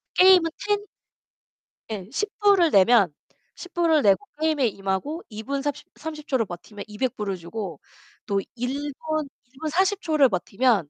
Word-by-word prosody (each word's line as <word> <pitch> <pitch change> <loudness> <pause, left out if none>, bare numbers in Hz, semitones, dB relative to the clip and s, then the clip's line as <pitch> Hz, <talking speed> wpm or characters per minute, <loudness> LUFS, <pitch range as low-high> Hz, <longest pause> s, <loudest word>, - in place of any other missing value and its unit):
게임은 365 -3 +6
1텐? 410 +4 -2 1.0
예, 200 -4 -5
$10 420 +9 -1
불을 395 -6 +5
내면, 195 -4 +5 0.4
$10 360 - -11
불을 330 -3 +3
내고 200 +5 +3 0.2
게임에 305 -6 +2
임하고 200 - -3
2 215 0 -7
분 275 +2 -2
삽십 290 -1 -4
30 305 -1 -7
초를 255 -5 +1
버티면 200 +3 -9
$200 235 +4 -2
불을 200 -3 -3
주고, 175 -2 -6 0.5
또 200 -1 0 0.2
1 280 +4 -2
분 310 +1 -2 0.2
1 245 - -36
분 310 - -1
40 380 +4 +1
초를 305 -5 +4
버티면 195 - +1
270 Hz, 215 characters per minute, -24 LUFS, 205-320 Hz, 1.0 s, 게임은